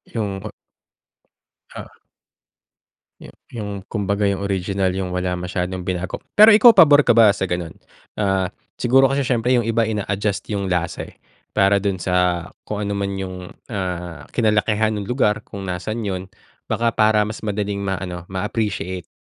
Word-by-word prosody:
Yung 100 -4 -2
ba. - - -7 1.3
Oo. - - -10 1.2
Yu - - -12 0.2
yung 105 -4 -6
kumbaga, 100 -1 0
yung 100 0 -2
original. 95 -1 -1
Yung 95 -1 -3
wala 90 0 -1
masyadong 90 +1 -3
binago. 90 0 -4 0.2
Pero, 215 +1 +9
ikaw 220 +3 +8
pabor 145 -2 +8
ka 120 - +2
ba 110 -3 +7
sa 100 - -2
ganun? 85 -2 -3 0.4
Ah, 95 -3 0 0.3
siguro 135 +2 +4
kasi 140 0 0
syempre 125 0 +1
yung 120 - 0
iba 115 0 +1
ina-adjust 100 -1 -2
yung 100 -2 -2
lasa, 90 -2 -2
eh, - - -21 0.4
para 100 0 +4
dun 100 -1 -1
sa 90 -1 0 0.2
kung 105 -1 -4
ano 100 - -2
man 100 -1 -2
yung, 95 -1 -6 0.2
ah, 90 -5 -4
kinalakihan 110 -1 +1
nung 105 -2 -4
lugar 105 -4 +1
kung 100 -2 -9
nasan 100 +5 -4
yun. 95 -1 -4 0.4
Baka, 115 -1 0
para 110 -1 +3
mas 110 +1 -6
madaling 105 -1 -2
ma-ano, 95 -2 -4
ma-appreciate 95 -2 -3
100 Hz, 155 wpm, -21 LUFS, 95-110 Hz, 1.3 s, Pero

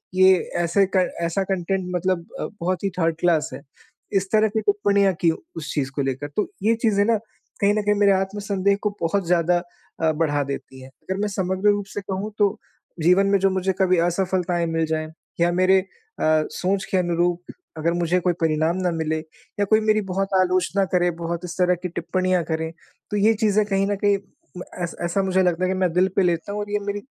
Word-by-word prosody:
ये 185 0 +7 0.3
ऐसे 185 +4 +3
क 185 - +4 0.2
ऐसा 170 +4 0
कंटेंट 190 0 -2
मतलब 180 -1 0
अ, - - -2
बहुत 180 +1 -1
ही 200 - +1
थर्ड 165 -1 +2
क्लास 170 -3 +2
है। - - -7 0.5
इस 195 -1 0
तरह 215 0 +4
की 220 +1 -1
टिप्पणियाँ 200 -1 +2
की 170 -2 +4
उस 160 -1 -8
चीज़ 135 -3 -1
को 145 - 0
लेकर 135 +2 -3
तो 215 - 0
ये 225 +2 +3
चीज़ें 205 -3 +3
ना, 230 0 +3 0.4
कहीं 200 0 +4
न 215 - +1
कहीं 210 0 +3
मेरे 205 -1 +4
आत्मसंदेह 200 0 0
को 210 - +2
बहुत 180 +3 0
ज़्यादा 175 0 +3 0.4
अ, 160 -1 +3
बढ़ा 150 -2 0
देती 135 -1 -7
हैं। 130 - -11
अगर 190 +8 -6
मैं 210 - +1
समग्र 190 +1 0
रूप 205 -1 -2
से 205 - -3
कहूँ 195 +2 -4
तो 205 -1 +2 0.4
जीवन 180 +4 +4
में 200 0 +4
जो 195 +1 +3
मुझे 190 0 0
कभी 185 -1 +3
असफलताएँ 180 -1 0
मिल 165 0 0
जाएँ, 155 0 -2 0.3
या 170 0 +4
मेरे 185 +2 +4
अ, 185 - -6 0.7
सोच 190 +1 -1
के 190 - +2
अनुरूप 175 0 0 0.3
अगर 165 +2 0
मुझे 175 +1 +1
कोई 180 0 +1
परिणाम 160 +2 +1
न 175 - 0
मिले, 160 -1 -1
या 205 +7 -6
कोई 215 +2 +4
मेरी 215 0 +2
बहुत 195 +1 -1
आलोचना 185 +2 +1
करे, 175 -1 +3
बहुत 170 +1 -4
इस 175 -2 -7
तरह 180 0 +3
की 180 - -3
टिप्पणियाँ 180 +1 0
करे 160 0 -2 0.4
तो 210 - 0
ये 215 +2 +4
चीज़ें 215 -1 +2
कहीं 195 -1 0
न - - +1
कहीं 200 -1 +4 0.7
ऐस 170 - -4
ऐसा 185 +3 0
मुझे 190 0 +2
लगता 180 0 +1
है - - 0
कि 190 - -1
मैं 185 -2 +2
दिल 180 +2 +3
पे - - +5
लेता 175 +2 0
हूँ 210 - -3
और 205 0 -6
ये 210 - +1
मेरी 205 0 -3
185 Hz, 210 wpm, -23 LUFS, 170-200 Hz, 0.7 s, ये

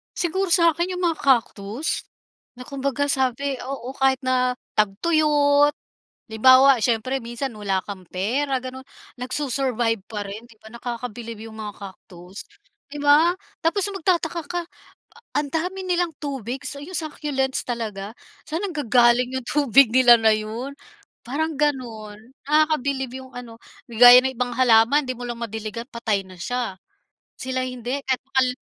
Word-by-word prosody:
Siguro 380 +3 -1
sa 335 -1 +4
akin 345 +3 -2
yung 360 - -4
mga 335 -2 +1
cactus, 235 0 0 0.5
na 250 - -9
kumbaga 275 0 -2
sabi 265 +1 -1
oo, 260 -1 -5
kahit 265 -1 +3
na 255 -1 +1 0.2
tagtuyot. 290 +6 +3 0.6
Halimbawa, 260 +4 +6
siyempre 250 +3 0
minsan 240 +3 -4
wala 195 -2 -1
kang 195 -2 -7
pera 255 - -1
ganun. 260 +1 -8 0.3
Nag-su-survive 250 -4 -1
pa 215 -1 -6
rin, 210 +3 -8
'di 230 -2 -20
ba, 220 - -13
nakakabilib 235 -1 -7
yung 220 - -12
mga 210 -1 -6
cactus. 190 -1 -11 0.5
'Di 295 - -6
ba? 295 +4 +5 0.3
Tapos 390 +4 +1
magtataka 360 -3 -1
ka, 350 +4 -3 0.8
ang 290 0 0
dami 360 +4 -2
nilang 355 -2 0
tubig 265 -3 -4
sa 280 - -7
yung 365 - -11
succulents 290 -4 -2
talaga. 215 -4 -5 0.4
Saan 320 +2 -2
nanggagaling 250 - +2
yung 250 - -10
tubig 275 -3 +5
nila 245 -1 +7
na 220 -1 +5
yun? 225 +6 -5 0.5
Parang 315 +6 -2
ganun. 240 -8 -2 0.3
Nakakabilib 280 -4 +1
yung 260 - -16
ano, 240 -2 -9 0.3
'di 235 - -9
gaya 245 0 +11
ng 265 - 0
ibang 245 0 -2
halaman 250 +3 +4
'di 255 - -3
mo 245 - -6
lang 240 -1 -6
madiligan, 220 0 -5
patay 225 -4 -1
na 185 -1 -13
siya. 245 0 -3 0.6
Sila 260 0 -3
hindi, 250 +2 -4
kahit 260 -1 0
makal 265 -1 +2
255 Hz, 145 wpm, -23 LUFS, 230-290 Hz, 0.8 s, gaya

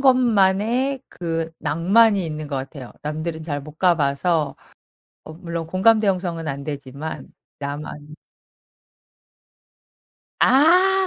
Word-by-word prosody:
것만의 245 0 +3
그 165 -2 -3
낭만이 195 +6 +3
있는 155 -1 -5
것 140 - -3
같아요. 135 -1 -7
남들은 155 +2 -4
잘 145 -3 -3
못 150 +2 -13
가 180 -2 +4
봐서. 150 +1 0 0.7
어 155 - -10
물론 170 0 -5
공감대 215 +5 +3
형성은 175 -4 -1
안 140 -1 -4
되지만. 145 +1 -6 0.3
나만. 145 +1 -7 2.3
아. 365 +7 +5
165 Hz, 200 characters per minute, -22 LUFS, 150-210 Hz, 2.3 s, 아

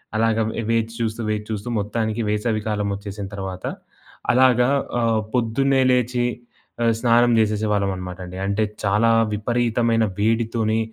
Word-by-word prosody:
అలాగా 115 0 +2
వె 115 - -3
వేచి 115 0 0
చూస్తూ, 115 0 -2
వేచి 105 0 -2
చూస్తూ 110 +2 -4
మొత్తానికి 110 +2 -2
వేసవి 105 +1 0
కాలమొచ్చేసిన 100 -1 -3
తర్వాత, 95 -1 -6 0.7
అలాగా 125 0 +4 0.3
ఆహ్, 115 -2 +2
పొద్దున్నే 130 +3 +2
లేచి 125 0 +1 0.6
ఆహ్, 115 - +3
స్నానం 120 0 +4
చేసేసేవాళ్ళమనమాట 100 -4 -1
అండి. 90 +1 -8
అంటే, 100 +2 +1 0.2
చాలా 105 +4 +3 0.2
విపరీతమైన 115 +1 +1
వేడితోనే 110 0 +1
110 Hz, 120 wpm, -22 LUFS, 105-115 Hz, 0.7 s, అలాగా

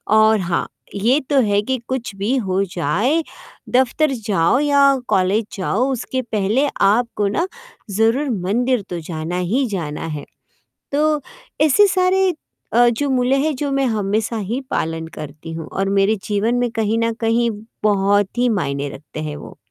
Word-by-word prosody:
और 220 0 +5
हाँ, 170 -2 -1 0.3
ये 235 +8 +3
तो 280 -2 +4
है 205 -2 +2
कि 260 +5 -1
कुछ 255 -5 -3
भी 205 +7 0
हो 195 -4 0
जाए 195 - 0 0.5
दफ़्तर 260 +4 +2 0.2
जाओ 195 +4 +3
या 280 -1 +4
कॉलेज 195 +4 +2
जाओ 225 +7 0
उसके 260 +1 -2
पहले 225 +4 0
आपको 210 0 +2
ना 335 - 0 0.4
ज़रूर 225 +8 +2
मंदिर 235 +4 0
तो 175 -1 -3
जाना 165 +2 -3 0.2
ही 270 +2 +2
जाना 165 -9 -4
है। 150 -3 -5 0.7
तो 300 +1 +2 0.4
ऐसे 315 +7 +6
सारे 375 0 +3 0.4
अ, 240 +1 +6
जो 280 +5 -1
मूल्य 255 0 +2
है 310 - 0
जो 285 +1 -3
मैं 275 0 +1
हमेशा 215 +3 -1
ही 220 +6 -3
पालन 160 0 -2
करती 150 +2 -8
हूँ 160 -1 -6
और 195 0 -2
मेरे 200 +2 +3
जीवन 215 +3 0
में 245 -1 +1
कहीं 225 -1 0
न 230 0 +1
कहीं 230 +1 +2 0.3
बहुत 205 0 +2
ही 245 0 +3
मायने 140 -9 -1
रखते 150 +2 -9
हैं 150 -1 -4
वो। - - -11
220 Hz, 160 wpm, -20 LUFS, 195-260 Hz, 0.7 s, ऐसे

